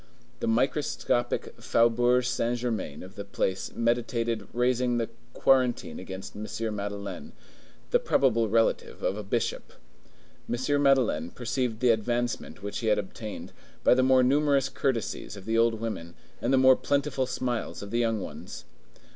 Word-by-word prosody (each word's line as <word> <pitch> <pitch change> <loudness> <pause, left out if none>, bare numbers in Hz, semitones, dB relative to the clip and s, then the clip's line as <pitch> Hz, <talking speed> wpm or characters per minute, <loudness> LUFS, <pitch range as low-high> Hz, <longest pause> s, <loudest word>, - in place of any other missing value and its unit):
The - - -2
microscopic 120 0 0
Faubourg 120 +2 +3
Saint 120 0 0
Germain 115 -11 -3
of 95 +1 -11
the 100 - -6
place 95 -1 -2
meditated 115 -2 0
raising 125 0 +1
the 115 -1 -1 0.2
quarantine 130 -2 +2
against 95 0 -8
M. 105 +1 -5 0.3
Madeleine, 100 -2 -5 0.6
the - - +5
probable 115 -4 +2
relative 115 +1 +1
of - - +1
a 105 - -4
bishop. 115 +4 -2 0.8
M. 135 +4 +1
Madeleine 125 - +3
perceived 120 -1 -2
the 125 -2 +5
advancement 120 -1 -2
which 100 - -4
he 115 - -3
had 105 -1 +4
obtained, 105 +2 -6 0.3
by - - +6
the 130 - +3
more 130 0 +5
numerous 140 0 +3
courtesies 115 -5 -2
of 95 - -11
the 115 +1 0
old 115 0 +4
women 100 -7 -5 0.3
and 120 - 0
the 135 - +5
more 130 0 +7
plentiful 140 -2 0
smiles 125 -5 -3
of 100 - -8
the 120 - +1
young 115 -2 +1
ones. - - -8
120 Hz, 150 wpm, -28 LUFS, 105-125 Hz, 0.8 s, more